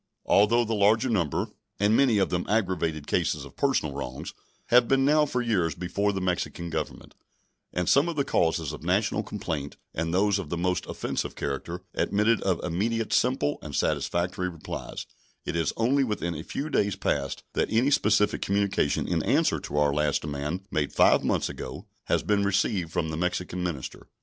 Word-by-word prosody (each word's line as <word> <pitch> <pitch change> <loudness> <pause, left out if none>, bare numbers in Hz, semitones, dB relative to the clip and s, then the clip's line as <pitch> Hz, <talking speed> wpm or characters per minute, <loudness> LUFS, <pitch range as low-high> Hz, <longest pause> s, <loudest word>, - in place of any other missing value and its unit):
Although 115 +4 +4
the 115 - -2
larger 110 +4 +3
number 85 -9 0 0.3
and 105 +2 +3
many 125 -5 +4
of 95 - +1
them 90 0 -1
aggravated 90 -8 0
cases - - 0
of - - -14
personal 130 - +1
wrongs 65 -2 -6 0.4
have 120 0 +6
been 135 0 +3
now 150 +1 +4
for 125 -3 -1
years 90 -10 +1
before 100 +3 -1
the 95 - -3
Mexican 90 -2 -2
Government, - - -5 0.6
and 90 -1 -2
some 145 +5 +4
of 170 - -3
the 140 -2 0
causes 80 - +1
of 75 - -8
national 100 +5 +1
complaint, 80 -9 -5 0.2
and 80 +1 -2
those 100 +2 +2
of 95 - -6
the 85 - -2
most 90 +1 -1
offensive - - -3
character, 85 +6 -4
admitted 105 +3 +2
of 95 -3 0
immediate, 110 +6 -1
simple, 125 - +1
and - - -7
satisfactory 90 +1 0
replies, 85 -3 -7 0.4
it - - -3
is 80 -4 +1
only 130 +5 +3
within 105 -8 -2
a 75 - -5
few 145 - -5
days 100 -7 +1
past 70 0 -2
that - - 0
any 125 +6 +2
specific 105 -5 +3
communication 100 -6 +1
in - - 0
answer - - +2
to 75 - -5
our 75 -1 +3
last 75 0 +1
demand, 75 +4 -3
made 75 -2 0
five - - +4
months - - +1
ago, - - -7 0.2
has - - +1
been 105 -1 +2
received 100 -3 0
from 80 -1 -1
the 80 - -4
Mexican 90 +1 -2
minister. 85 -7 -5
95 Hz, 180 wpm, -27 LUFS, 80-110 Hz, 0.6 s, have